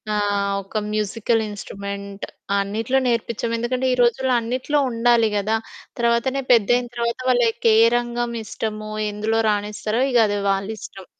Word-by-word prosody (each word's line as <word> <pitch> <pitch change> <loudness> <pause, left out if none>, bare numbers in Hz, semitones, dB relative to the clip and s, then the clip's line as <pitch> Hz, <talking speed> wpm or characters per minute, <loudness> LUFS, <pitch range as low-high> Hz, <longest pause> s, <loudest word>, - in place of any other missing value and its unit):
ఆహ్, 205 -1 0
ఒక 205 +3 -3
musical 215 +2 0
instrument. 200 0 -7 0.3
అన్నిట్లో 220 +6 0
నేర్పించం. 235 -1 -1
ఎందుకంటే 250 +2 -1
ఈ - - +2
రోజుల్లో 250 +2 +2
అన్నిట్లో 255 +5 -1
ఉండాలి 230 -1 +3
కదా! 210 +2 0 0.4
తర్వాతనే 235 +3 +1
పెద్దయిన 245 +1 +4
తర్వాత, 235 0 -1
వాళ్ళ‌‌కే 235 -2 +3 0.2
రంగం 240 0 -2
ఇష్టమో, 215 0 -5 0.2
ఎందులో 215 +2 -1
రాణిస్తారో 210 +2 -1
ఇక 245 - +4
అది 205 - -1
వాళ్ళిష్టం. 195 -1 -5
225 Hz, 125 wpm, -22 LUFS, 205-240 Hz, 0.4 s, పెద్దయిన